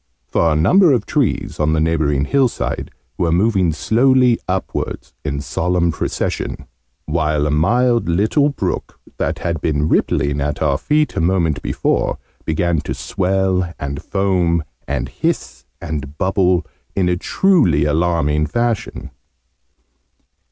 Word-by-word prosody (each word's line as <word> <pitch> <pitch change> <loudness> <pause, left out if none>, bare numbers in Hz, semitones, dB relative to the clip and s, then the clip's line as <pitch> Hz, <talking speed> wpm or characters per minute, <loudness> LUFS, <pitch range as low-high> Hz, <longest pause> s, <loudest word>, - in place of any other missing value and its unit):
For 80 +6 +1
a - - +1
number 160 - +5
of 125 - 0
trees, 140 -9 -1
on 75 0 +2
the 80 - +1
neighbouring 75 -3 +1
hillside, 130 - 0 0.3
were 85 -2 +1
moving 95 -1 +2
slowly 125 - +3
upwards, 95 0 -3
in 70 -1 -3
solemn 85 +2 0
procession: - - -3 0.4
while 75 -1 0
a 75 - 0
mild 115 +8 +2
little 110 - +2
brook, 140 - -4 0.2
that - - -1
had 85 -3 -3
been 75 -1 0
rippling 70 -2 +1
at 75 0 -2
our 70 -3 +1
feet 150 0 +1
a - - 0
moment 85 -3 +1
before, - - 0 0.3
began 80 0 0
to - - -4
swell, 95 -2 0
and 70 +1 -5
foam, 90 -4 +1 0.2
and 65 -2 -2
hiss, 65 - -3
and 75 -3 -5
bubble, 90 -1 +1 0.3
in 95 -2 +1
a 90 - +2
truly 180 - +2
alarming 75 -1 +1
fashion. 120 +5 -2
85 Hz, 130 wpm, -18 LUFS, 75-100 Hz, 0.4 s, number